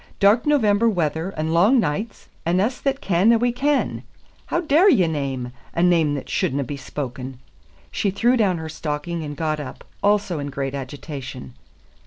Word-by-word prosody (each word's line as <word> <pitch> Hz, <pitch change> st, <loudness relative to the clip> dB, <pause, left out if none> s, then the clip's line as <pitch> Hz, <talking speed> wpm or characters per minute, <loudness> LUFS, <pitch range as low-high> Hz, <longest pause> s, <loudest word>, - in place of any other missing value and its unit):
"Dark 210 Hz, +7 st, +4 dB
November 230 Hz, -6 st, +3 dB
weather 165 Hz, -3 st, -1 dB
and 160 Hz, +1 st, -1 dB
lang 205 Hz, +10 st, +5 dB
nichts, 210 Hz, +4 st, -2 dB, 0.2 s
and 175 Hz, +2 st, +1 dB
us 235 Hz, +6 st, 0 dB
that 275 Hz, 0 st, -1 dB
ken 190 Hz, +4 st, +3 dB
a' 235 Hz, -, +5 dB
we 245 Hz, +2 st, +1 dB
ken. 280 Hz, +4 st, 0 dB, 0.5 s
How -, -, 0 dB
daur 330 Hz, +5 st, +5 dB
ye 190 Hz, -, +5 dB
name 135 Hz, -6 st, -3 dB, 0.2 s
a 170 Hz, -, +2 dB
name 165 Hz, -5 st, +3 dB
that 140 Hz, -, -6 dB
shouldna 140 Hz, +2 st, 0 dB
be 145 Hz, +3 st, -5 dB
spoken?" 130 Hz, -2 st, -6 dB, 0.5 s
She 200 Hz, -, 0 dB
threw 235 Hz, +6 st, +2 dB
down 200 Hz, -7 st, +2 dB
her 160 Hz, -1 st, -5 dB
stocking 155 Hz, +1 st, -4 dB
and 145 Hz, -1 st, -6 dB
got 155 Hz, -2 st, -1 dB
up, 145 Hz, -, -8 dB, 0.2 s
also 200 Hz, -5 st, +2 dB
in 145 Hz, 0 st, -4 dB
great 135 Hz, -1 st, -3 dB
agitation. 135 Hz, -, -7 dB
170 Hz, 175 wpm, -22 LUFS, 145-215 Hz, 0.5 s, lang